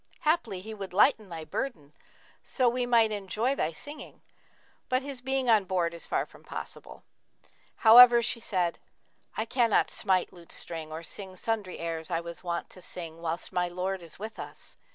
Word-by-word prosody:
Haply 240 - +1
he 220 +3 -7
would 195 -4 -7
lighten 215 0 +4
thy 165 -2 -6
burthen, 155 - -4 0.5
so 255 -3 +1
we 245 +1 +1
might 230 -2 +4
enjoy 210 +5 -1
thy 165 - -1
singing: 290 - -10 0.7
but 255 +1 +1
his 275 -3 -6
being 265 0 0
on 220 -3 +5
board 175 -2 0
is 170 - -7
far - - 0
from - - -18
possible.' - - -8 0.8
However 240 +1 +10
she 230 - +1
said, 180 -6 -1 0.6
'I 220 - 0
cannot 230 -2 +2
smite 185 -3 +1
lute 170 -2 -13
string 160 -2 -5
or 160 +1 -6
sing 190 +2 -8
sundry 210 -1 -2
airs 165 -1 -4
I 165 -2 0
was 170 +1 -8
wont 170 -1 -3
to 185 - -11
sing 165 -2 -7
whilst 165 0 -3
my 180 0 +1
lord 185 +2 -3
is 165 -2 -11
with 220 +3 -7
us.' - - -9
190 Hz, 175 wpm, -29 LUFS, 170-235 Hz, 0.8 s, However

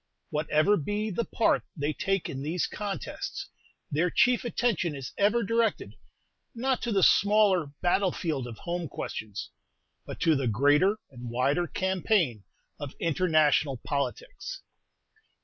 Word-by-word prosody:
Whatever 155 +6 +2
be 205 +7 -2
the 225 +5 -1
part 230 - +2 0.2
they 145 +1 -1
take 195 +1 -1
in 135 - -5
these 160 +5 -1
contests, 205 -2 -5 0.4
their 165 +5 +2
chief 245 +7 +3
attention 220 -10 0
is 130 -2 -7
ever 215 +4 +2
directed, 230 +1 0 0.6
not 260 +2 0
to 240 - -2
the 195 -3 +2
smaller 200 -5 +4 0.2
battle 185 +1 +3
field 150 -9 -3
of 115 -3 -8
home 175 +3 -3
questions, 105 -6 -6 0.6
but - - -7
to 160 -2 +4
the 135 -2 0
greater 145 - +3
and 125 -2 -8
wider 135 +8 +1
campaign 185 - 0 0.4
of 145 -1 -6
international 155 -4 +2
politics. - - -4
175 Hz, 130 wpm, -28 LUFS, 145-205 Hz, 0.6 s, smaller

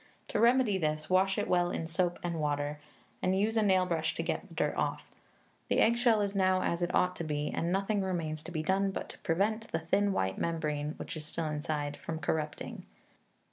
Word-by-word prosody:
To - - 0
remedy 235 -3 +4
this, 155 0 -1
wash 190 +1 +3
it - - 0
well 175 -1 +3
in 165 - -3
soap 175 +2 0
and 170 -2 -2
water, 145 0 -1 0.4
and 185 +1 +2
use 215 +3 +1
a 220 - +4
nail 190 -3 +4
brush 165 -3 -1
to - - -2
get - - -2
the - - -14
dirt - - +1
off. - - -1 0.6
The - - +2
eggshell 235 -1 +4
is 200 -1 -1
now 185 -1 +3
as 170 +1 0
it 175 - 0
ought 180 0 +3
to - - -3
be, 150 -1 -2
and 170 - -1
nothing 200 +2 +1
remains 165 -5 -2
to 180 - -7
be 155 -2 -2
done 195 +3 +2
but 190 - -5
to - - -10
prevent 215 +7 0
the - - +1
thin 195 +5 +1
white 95 - -1
membrane 150 -2 -1
(which - - -6
is 155 -1 -6
still 165 +1 -3
inside) 150 -1 -2
from 165 - -5
corrupting. 155 -2 -3
175 Hz, 215 wpm, -31 LUFS, 155-195 Hz, 0.6 s, remedy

